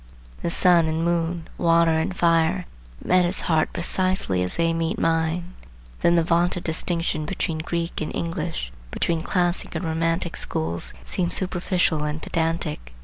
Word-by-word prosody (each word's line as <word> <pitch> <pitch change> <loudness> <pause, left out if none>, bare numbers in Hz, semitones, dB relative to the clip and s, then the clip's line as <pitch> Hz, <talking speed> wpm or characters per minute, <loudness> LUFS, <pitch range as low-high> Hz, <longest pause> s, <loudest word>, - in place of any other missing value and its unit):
The - - -1
sun 170 -1 +4
and 160 +1 -1
moon, 170 -1 -1
water 165 -1 +4
and 160 +3 +1
fire, 170 +2 +2 0.4
met 185 0 +4
his 175 +2 +1
heart 160 -2 +1
precisely 185 - 0
as 90 0 -2
they 165 0 +2
meet 165 +5 -1
mine. 165 +1 0 0.5
Then 170 - +4
the 170 - +4
vaunted 175 +1 +2
distinction 165 -1 -1
between 165 -3 -2
Greek 170 +1 -3
and 155 - -3
English, 165 - -3 0.2
between 165 - -1
Classic 175 0 0
and 165 +3 -2
Romantic 165 +1 0
schools, 85 +2 -2
seems 175 - -1
superficial 180 -3 0
and 150 +1 -2
pedantic. 160 - -2
165 Hz, 145 wpm, -24 LUFS, 160-175 Hz, 0.5 s, sun